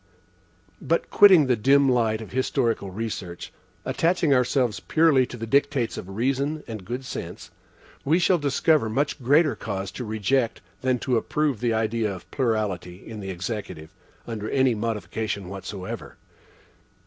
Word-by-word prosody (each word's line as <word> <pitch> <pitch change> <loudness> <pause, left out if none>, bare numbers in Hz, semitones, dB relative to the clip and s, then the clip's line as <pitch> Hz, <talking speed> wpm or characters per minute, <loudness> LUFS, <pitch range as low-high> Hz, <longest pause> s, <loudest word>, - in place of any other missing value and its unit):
But - - -1
quitting 190 -7 +7
the 130 -1 +2
dim 135 +5 +4
light 115 -3 +2
of 110 - -9
historical 120 -5 0
research, 95 -4 -6 0.3
attaching 165 -3 +2
ourselves 125 -2 +1
purely 155 -6 +3
to 125 - -8
the 115 - -5
dictates 140 -1 +1
of 95 - -7
reason 135 +8 -1
and 110 -4 -6
good 125 +6 -5
sense, - - -7 0.5
we 155 +5 +3
shall 180 0 +3
discover 145 -2 +2
much 140 +5 -1
greater 145 +4 +3
cause 95 0 -4
to 125 - -6
reject 115 +3 0 0.2
than 130 -1 +1
to 125 0 0
approve 145 0 0
the 120 -2 0
idea 110 -1 0
of 95 -2 -10
plurality 105 -8 -2
in 110 -1 -7
the 95 -1 -6
Executive, 90 -4 -6 0.3
under 110 -2 -5
any 130 -2 +3
modification 105 -2 -3
whatever. 95 0 -7
115 Hz, 145 wpm, -25 LUFS, 105-135 Hz, 0.5 s, quitting